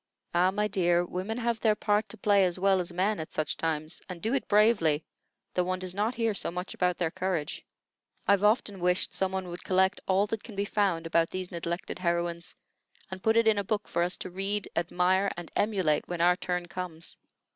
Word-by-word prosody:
"Ah, 175 +2 +4
my 210 +2 0
dear, 175 -3 +2
women 185 +6 -4
have 235 -1 -1
their 215 -1 +3
part 210 0 +1
to - - -9
play 205 -2 +4
as 180 -1 +1
well 190 0 +3
as 175 -1 -2
men 190 +4 0
at 160 - -6
such 155 - -1
times, 155 0 -2
and 180 -2 -6
do 220 +8 -1
it 270 -5 -1
bravely, 200 -8 +3 0.5
though 180 - +2
one 185 +1 -1
does 185 -1 -3
not 215 +5 0
hear 230 -3 +1
so 195 - -1
much 180 +2 -5
about 180 -1 0
their 170 -3 0
courage. 175 -6 -2 0.6
I've 200 0 +4
often 210 -2 +2
wished 180 +1 +1
some 190 -1 0
one 190 -1 -3
would 175 +1 -6
collect 190 0 +2
all 195 +2 +3
that 215 0 -4
can 220 - -10
be 200 +1 0
found 195 -6 0
about 165 0 +2
these 185 -1 -5
neglected 170 0 -4
heroines, 170 -1 -1 0.6
and 190 0 -6
put 220 +2 +3
it 230 - +5
in 215 -2 +4
a - - -1
book 210 +1 -2
for 170 - -1
us 180 +1 +1
to 185 - -7
read, 195 +2 -2
admire, 180 +3 +2
and 175 -1 -7
emulate 190 -8 +1
when 175 -1 -4
our 175 +1 +5
turn 180 -1 -2
comes." 175 -2 -6
185 Hz, 215 wpm, -29 LUFS, 175-205 Hz, 0.6 s, it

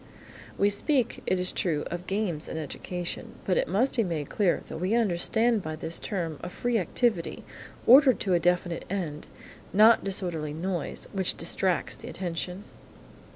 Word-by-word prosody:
We 200 +1 +3
speak, 250 +3 +1
it 185 - +2
is 180 0 +2
true, 155 -5 0
of 175 +1 -5
games 190 -6 -1
in - - -5
education, 175 +3 -5
but 185 - +2
it - - +1
must 220 +10 +1
be 230 - +3
made 160 -6 -3
clear 195 -5 +1
that - - -6
we 185 +6 +1
understand 225 +2 +2
by 155 -2 -5
this 160 +2 -3
term 165 -6 -3
a - - -5
free 240 +4 0
activity, 195 0 0 0.4
ordered 260 0 +7
to 190 - +1
a 175 - +4
definite 175 0 0
end; 170 -6 -4 0.4
not 220 +3 +6
disorderly 175 -6 -2
noise, 170 0 -3
which 190 -3 0
distracts 185 -2 0
the - - -9
attention. 180 +1 -4
185 Hz, 160 wpm, -27 LUFS, 170-210 Hz, 0.4 s, ordered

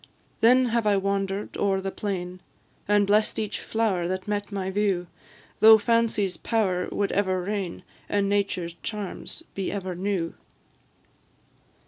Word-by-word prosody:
Then 255 +3 +5
have 230 -1 +1
I 205 -1 +4
wander'd 195 0 -2
o'er 195 -1 +1
the 195 0 -3
plain, 185 -3 -4 0.5
And 205 0 +4
bless'd 210 +2 +2
each 215 -1 -2
flower 205 -6 0
that 185 +2 -3
met 205 0 -2
my 190 -1 -2
view; 195 -3 +1 0.5
Thought 220 -1 +8
Fancy's 230 -5 +1
power 190 -6 0
would 200 -1 0
ever 190 -2 +1
reign, 195 -2 -3 0.3
And 205 -1 +1
Nature's 195 -4 0
charms 210 - -6
be 195 -2 -3
ever 190 -2 -3
new. 180 -2 -2
200 Hz, 135 wpm, -26 LUFS, 185-210 Hz, 0.5 s, Thought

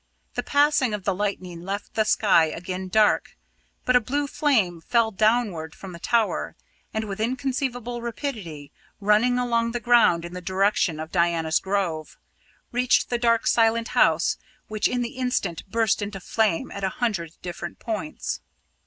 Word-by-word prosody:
The - - -1
passing 285 -5 +2
of 205 - -7
the 195 - +1
lightning 185 -3 -3
left 195 +3 -5
the 220 - +2
sky 200 -6 +4
again 180 +4 -5
dark, 210 +3 +2 0.5
but 250 - +3
a - - +8
blue 285 +6 -1
flame 220 - +1
fell 230 +5 +2
downward 210 -7 +1
from 195 - -9
the 170 - -9
tower, 230 +3 0 0.4
and, 220 - -2
with 205 -1 -6
inconceivable 245 0 -2
rapidity, 215 - -5 0.3
running 210 +5 +3
along 235 -2 0
the 240 - -1
ground 235 -9 +4
in 170 - -8
the 180 - -6
direction 190 -3 +1
of 160 +1 -6
Diana's 170 -2 +2
Grove, 185 -6 -2 0.5
reached 250 +1 +2
the 240 - +1
dark 230 -1 +2
silent 230 0 +3
house, - - +3 0.3
which 215 -1 0
in 245 -1 -1
the 235 +2 -6
instant 250 -9 -2
burst 225 -1 +1
into 205 -1 -4
flame 210 -2 0
at 200 - -6
a 190 - +2
hundred 190 -10 -1
different 175 -1 -6
points. 230 +7 -4
215 Hz, 160 wpm, -24 LUFS, 180-240 Hz, 0.5 s, a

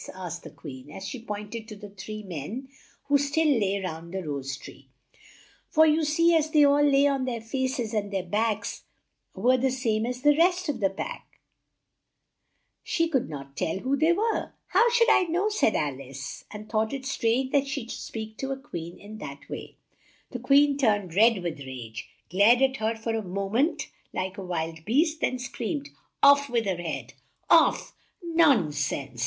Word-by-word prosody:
asked 175 -2 -6
the - - -10
Queen, 130 +1 -10
as 190 - -7
she 260 - -5
point 210 -2 -6
ed 225 -1 -6
to 215 - -8
the 205 -1 -11
three 215 +2 -7
men 195 - -6 0.4
who 285 0 +3
still 290 +3 +1
lay 200 -1 0
round 170 -3 -6
the 190 0 -4
rose 140 -3 -4
tree; - - -13 0.8
for 315 0 +5
you 315 +1 +3
see 335 +3 +3
as 315 -2 +3
they 305 -2 +5
all 285 0 +5
lay 280 -1 +5
on 275 -2 +1
their 240 -3 -2
faces 250 0 -2
and 205 -2 -1
their 190 -2 -2
backs 210 +2 -1 0.5
were 245 +7 +3
the 265 +1 +1
same 235 -3 0
as 250 +1 -5
the 295 0 +6
rest 355 +2 +3
of 285 -5 -2
the 195 -3 +2
pack, 195 - -7 1.4
she 330 0 0
could 270 - 0
not 140 -2 -8
tell 160 - -1
who 260 +7 0
they 315 +4 +3
were. 435 +6 0 0.2
"How 475 - +4
should 470 0 +4
I 370 - +5
know?" 355 +5 0
said 415 - +2
Al 140 -3 -1
ice, 135 +1 -8
and 210 0 -9
thought 220 +1 0
it 270 -1 -5
strange 260 0 0
that 280 -1 +2
she 275 +1 -3
should 230 - -9
speak 220 -1 -6
to 270 - -4
a 270 - -2
Queen 170 - -7
in 215 +1 -10
that 140 -6 -9
way. - - -7 0.6
The 250 - -4
Queen 280 +3 +4
turned 205 - +1
red 215 0 +4
with 165 -3 -3
rage, 125 -5 -8 0.2
glared 220 +7 +5
at 270 0 +2
her 220 +1 0
for 225 0 -3
a 225 - -1
mo 195 0 -4
ment 265 - +1 0.3
like 185 +2 -3
a - - -5
wild 165 -2 -3
beast, 305 - +1
then 255 - +1
screamed, 270 +3 -4 0.3
"Off 280 0 +6
with 235 -2 0
her 190 -3 -1
head! 165 -2 -5 0.4
Off - - +4 0.2
" - - -31
"Non 320 - +4
sense!" 140 -3 -3
225 Hz, 195 wpm, -27 LUFS, 190-280 Hz, 1.4 s, the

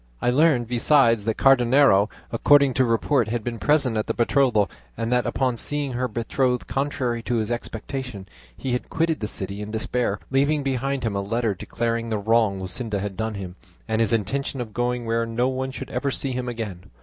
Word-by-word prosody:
I 125 - +1
learned 135 -3 +3
besides 120 -2 +3
that 110 -1 -1
Cardenio, 125 -5 +5 0.2
according 140 +3 +4
to 130 +1 +3
report, 115 +1 +1
had 115 0 -2
been 115 -1 -4
present 140 -6 +2
at 110 - -1
the - - -1
betrothal; 120 -4 +3 0.3
and 115 +1 -2
that 125 0 +2
upon 130 -3 0
seeing 145 +1 -2
her 125 +1 -1
betrothed 125 +2 -1
contrary 125 -2 -2
to 120 +1 -2
his 110 0 -1
expectation, 120 -2 -5 0.3
he 130 - -3
had 125 - -2
quitted 165 -1 0
the 105 - -3
city 100 0 -4
in 105 - -6
despair, 110 -1 -1
leaving 140 +2 +2
behind 135 0 -1
him 110 -3 -1
a 100 - 0
letter 115 +2 0
declaring 115 +4 -3
the 110 - 0
wrong 110 -1 +2
Luscinda 105 +3 -3
had 100 0 -4
done 110 +2 -3
him, 95 -2 -7 0.3
and 110 0 0
his 110 - +2
intention 130 +5 -1
of 115 -3 -5
going 120 +1 -1
where 115 0 0
no 120 +2 0
one 130 0 -2
should 130 - -7
ever 130 +3 -1
see 135 0 -2
him 125 0 -3
again. 105 -7 -6
120 Hz, 195 wpm, -24 LUFS, 110-130 Hz, 0.3 s, Cardenio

